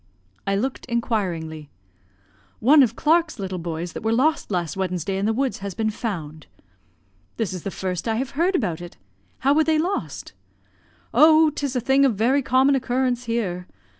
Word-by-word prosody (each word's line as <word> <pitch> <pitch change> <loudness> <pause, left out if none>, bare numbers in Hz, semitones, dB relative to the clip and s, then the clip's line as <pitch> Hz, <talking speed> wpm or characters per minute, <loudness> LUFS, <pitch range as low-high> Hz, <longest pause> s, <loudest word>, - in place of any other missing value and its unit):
I 195 - +1
looked 255 +6 -3
inquiringly. 175 - -2 0.9
"One 285 +6 +6
of 235 -3 +2
Clark's 325 +2 +2
little 190 -3 -4
boys 170 0 -5
that - - -6
were 220 +1 0
lost 300 +7 +1
last 175 -6 -2
Wednesday 185 0 -2
in 195 +2 0
the - - +2
woods 260 +3 -1
has 195 -1 -6
been 220 -1 0
found." 160 - -5 0.9
"This 215 -5 -2
is 180 - -5
the 195 - -4
first 185 0 -4
I 225 - +1
have 260 +3 -2
heard 345 +6 +1
about 175 - -1
it. 175 0 -10 0.4
How 275 +2 +4
were 315 +2 +4
they 315 0 +2
lost?" 360 +6 -3 0.8
"Oh, 315 0 +6
'tis 280 -2 -3
a - - +2
thing 265 +3 +3
of 260 -5 +3
very 250 +7 +2
common 265 +1 +3
occurrence 250 -1 0
here. 190 -7 -2
230 Hz, 175 wpm, -23 LUFS, 185-270 Hz, 0.9 s, One